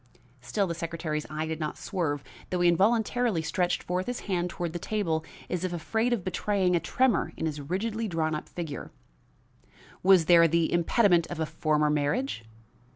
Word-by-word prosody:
Still 200 - 0
the 170 - -2
secretary's 165 -2 -3
eye 155 +1 -3
did 160 0 -4
not 155 -1 -3
swerve, 145 -6 -2 0.3
though 180 -1 -1
he 175 - +5
involuntarily 220 +1 +2
stretched 175 +3 0
forth 180 +1 -2
his 245 0 -3
hand 180 -3 -1
toward 170 -1 -4
the 175 - -3
table 170 -6 -1 0.2
as 180 0 -2
if 185 -1 -2
afraid 220 +8 0
of 230 -6 0
betraying 185 0 +1
a - - +3
tremor 255 +2 +1
in - - -2
his 150 -2 -3
rigidly 215 +9 -2
drawn 160 -4 -1
up 155 - -5
figure. 165 -5 -6 1.1
"Was 185 -3 +6
there 170 0 +7
the 165 0 +1
impediment 175 0 +3
of 175 - -6
a 160 - +1
former 150 -1 +1
marriage?" 150 - -1
175 Hz, 175 wpm, -28 LUFS, 160-195 Hz, 1.1 s, there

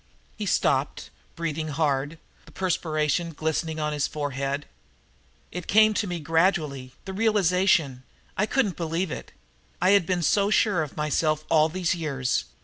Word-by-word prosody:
He 210 -2 -4
stopped, 140 -4 0 0.2
breathing 160 -1 -3
hard, 145 0 -1 0.3
the - - -14
perspiration 165 -2 -1
glistening 160 +1 -2
on 150 0 -1
his 145 -1 0
forehead. 140 -1 -3 0.9
"It 180 -1 -6
came 215 +1 +5
to 210 0 -1
me 175 -1 -3
gradually 155 -5 0
the 190 - -5
realization. 185 - +2 0.3
I 210 - +1
couldn't 215 -9 0
believe 165 +1 -2
it. - - -7 0.5
I 185 +2 +4
had 200 -5 +4
been 180 -2 0
so 200 +4 +3
sure 210 -4 +3
of 150 -3 -6
myself 155 0 0
all 155 -1 +5
these 180 +1 0
years. 140 -7 -1
160 Hz, 145 wpm, -25 LUFS, 150-185 Hz, 0.9 s, came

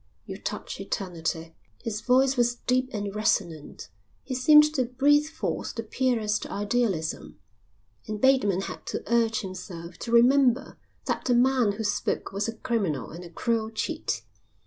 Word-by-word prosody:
You - - -7
touch - - -5
eternity." 165 -4 -4 0.3
His 215 -3 -3
voice 260 +3 +3
was 240 -1 +2
deep 255 +1 0
and 205 -3 -4
resonant. 170 - -1 0.4
He 265 - -5
seemed 300 +4 +6
to 260 -4 +1
breathe 285 +5 +3
forth 320 +1 -4
the 230 - -3
purest 225 -3 0
idealism, 205 -6 -2 0.7
and 215 -1 -4
Bateman 230 -8 +3
had - - -7
to - - -3
urge 230 -1 +2
himself 180 -3 -8
to 230 - -5
remember 250 +2 +4 0.3
that - - -2
the 245 - +3
man 245 -3 +3
who 220 +2 -5
spoke 205 -1 -1
was 200 +2 -2
a 225 - -4
criminal 200 - -2
and 170 +3 -9
a 175 - -10
cruel 220 +5 -1
cheat. 310 +8 -3
225 Hz, 150 wpm, -26 LUFS, 195-255 Hz, 0.7 s, seemed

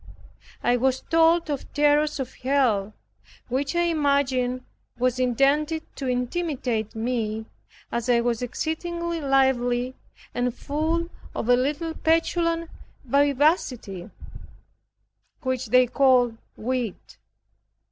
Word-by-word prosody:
I 245 - +3
was 260 +1 +1
told 330 +1 +3
of 280 - -5
terrors 295 0 +3
of 260 -2 -4
Hell 245 -7 +1 0.5
which 275 +6 -1
I 345 - +3
imagined 280 -6 +1 0.4
was 255 0 +1
intended 280 +6 +2
to 270 - -3
intimidate 250 - -2
me 220 -1 -2 0.5
as 235 +1 -2
I 240 -1 +5
was 235 -1 -1
exceedingly 335 +6 -3
lively, 260 -2 +2 0.4
and 245 0 0
full 320 +4 -1 0.3
of 230 - -3
a 245 - +7
little 295 +6 -1
petulant 330 +1 +1 0.3
vivacity 275 - +1 1.3
which 260 -1 -1
they 255 +3 +5
called 250 -2 +3 0.2
wit. 245 -3 -4
265 Hz, 105 wpm, -25 LUFS, 245-305 Hz, 1.3 s, a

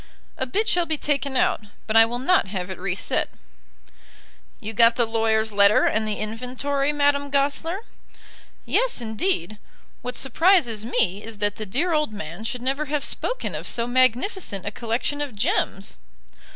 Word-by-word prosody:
"A 260 - -3
bit 425 - -1
shall 350 -4 +2
be 315 - -1
taken 280 -2 -1
out, - - +2 0.2
but 215 - -3
I 225 0 +8
will 240 +2 -3
not 270 - +2
have 190 -1 -4
it 190 - -7
reset." 195 0 -1 1.3
"You 220 -1 -6
got 230 +2 +5
the 240 - +3
lawyer's 220 -1 +1
letter 200 +1 +5
and 220 0 +1
the 210 - -1
inventory, 255 +6 -2
Madame 285 -1 +1
Goesler?" 290 +7 0 0.8
"Yes, - - +1
indeed. 220 - -2 0.4
What 250 0 -5
surprises 270 - +3
me 205 -4 0
is 225 -1 -7
that 205 0 0
the 215 - -5
dear 325 - 0
old 300 -7 0
man 170 +1 -7
should 245 +1 -4
never 275 +4 -1
have 295 -1 -2
spoken - - -1
of - - -5
so 235 - 0
magnificent 255 - +1
a 205 - -2
collection 235 +6 -2
of 280 -6 -4
gems." 195 -1 0
245 Hz, 165 wpm, -23 LUFS, 215-285 Hz, 1.3 s, I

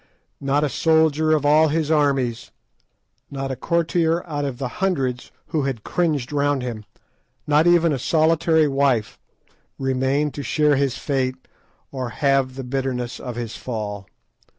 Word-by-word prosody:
Not 140 +2 +1
a - - +2
soldier 160 +1 +2
of 150 -2 +1
all 155 +2 +5
his 155 0 0
armies, 135 -6 +1 0.8
not 135 -1 -4
a - - -2
courtier 170 +1 0
out 145 -3 -2
of 135 -3 -4
the 130 - -3
hundreds 135 -10 -1 0.2
who 160 -3 0
had 125 -6 -3
cringed 150 -7 -1
round 145 -2 +1
him, 115 -4 -5 0.6
not 150 +2 +3
even 170 -2 +4
a 135 - -2
solitary 160 +2 +3
wife, 135 -5 0 0.6
remained 135 +2 0
to 145 - -5
share 150 +3 +2
his 135 -2 0
fate 130 -2 -2 0.4
or 130 -3 -4
halve 135 0 +1
the 135 - -5
bitterness 125 -1 -3
of 125 -2 -6
his 120 -2 -5
fall. 105 -5 -5
140 Hz, 150 wpm, -22 LUFS, 130-155 Hz, 0.8 s, all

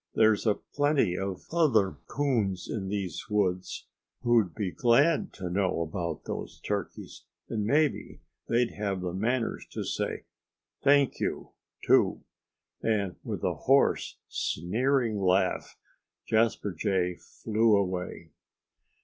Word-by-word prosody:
There's 110 0 +4
a 105 - +4
plenty 145 -10 +1
of 95 0 -4
other 135 - +2
coons 115 -10 0
in 100 -4 -3
these 95 -4 -4
woods 95 -3 -1 0.4
who'd 115 -8 +3
be 100 -4 -2
glad 140 - +3
to 95 - -6
know 90 -1 0
about 85 0 -4
those - - -6
turkeys. - - -5 0.2
And 105 -2 -1
maybe 150 +2 +1 0.3
they'd 120 0 +2
have 100 -3 -3
the 90 -1 -3
manners 115 +5 -1
to - - -3
say - - -3 0.6
'Thank 140 -1 +4
you!' - - -3 0.3
too." - - +3 0.6
And 100 -5 0
with - - -5
a - - +1
hoarse, - - +2
sneering 115 - 0
laugh 95 0 +1 0.5
Jasper 110 -2 +2
Jay 90 0 0
flew 110 -1 +1
away. 90 -4 -3
105 Hz, 120 wpm, -28 LUFS, 95-120 Hz, 0.6 s, There's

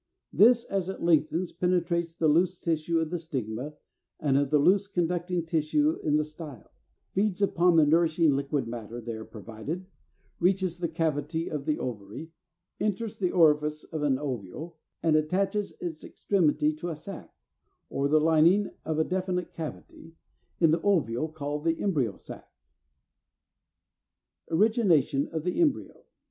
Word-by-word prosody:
This 235 +2 +6
as 190 -2 -2
it 190 - -6
lengthens 165 +1 +2
penetrates 170 -1 0
the 160 - +1
loose 175 +4 +2
tissue 165 0 0
of 160 -1 -1
the 175 - -2
stigma 135 -2 -5 0.4
and 140 -3 +1
of 140 -1 +1
a 150 - +5
loose 195 +7 +3
conducting 175 -2 -1
tissue 165 - +1
in 150 -1 +1
the 150 - +3
style, 150 -5 -10 0.4
feeds 195 -1 0
upon 180 -3 +3
the 160 -2 +6
nourishing 160 -1 +3
liquid 140 -1 -1
matter 115 0 -6
there 115 -1 -6
provided, 115 - -7 0.5
reaches 185 -1 +1
the 175 - 0
cavity 160 0 -2
of 150 -3 -4
the 155 -1 0
ovary, 115 +7 -6 0.5
enters 215 +1 -2
the 185 -3 +1
orifice 150 -3 +3
of 160 -2 -6
an 140 -3 +2
ovule, 145 - -6 0.2
and 160 -2 +3
attaches 195 +6 0
its 165 -3 -5
extremity 155 -5 +1
to 160 +3 -5
a 165 - -4
sac, 185 +4 -9 0.6
or 140 +1 0
the 155 +2 +4
lining 165 +6 +4
of 160 -1 -2
a 160 - +3
definite 185 0 -2
cavity, 165 0 -8 0.4
in 165 -3 +5
the 165 +1 +1
ovule, 155 - +1
called 150 -1 -4
the 165 0 0
Embryo 140 - 0
Sac. - - -11 2.0
344. 160 - -1
=Origination 180 - +3
of 160 -2 -4
the 180 - 0
Embryo. 300 -5 -1
160 Hz, 150 wpm, -28 LUFS, 150-180 Hz, 2.0 s, This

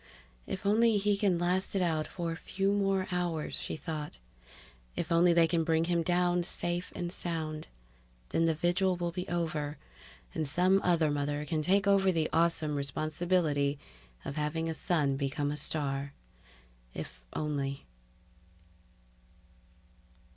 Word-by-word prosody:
If 190 - -5
only 220 +2 +4
he 205 0 +2
can 200 -3 +2
last 180 +3 0
it 195 - +2
out 160 -3 0
for 170 -2 -3
a - - -3
few 195 +3 -1
more 195 -2 +1
hours, 175 -3 -1
she - - -3
thought. 155 -2 -5 0.8
If 170 - -3
only 170 +1 +5
they 170 -1 +5
can 165 0 +1
bring 160 0 +2
him 170 0 +1
down 175 +1 +2
safe 175 +1 -2
and 175 0 -3
sound. 160 -4 -3 0.6
Then 165 - +2
the 165 -1 +2
vigil 180 +3 +2
will 175 -1 -2
be 180 +1 -4
over, 155 -4 -2 0.6
and 155 - -1
some 185 +6 +3
other 165 -4 +3
mother 145 +1 -1
can 155 0 -1
take 195 +6 +3
over 195 -1 +4
the 160 -3 0
awesome 165 -2 +2
responsibility 150 +1 0 0.5
of 140 - -5
having 155 +2 -1
a 165 - -1
son 150 -4 0
become 145 +1 -1
a - - -2
star 140 -2 -1 0.8
If 65 - -7
only 140 -3 -2
165 Hz, 145 wpm, -31 LUFS, 150-180 Hz, 0.8 s, only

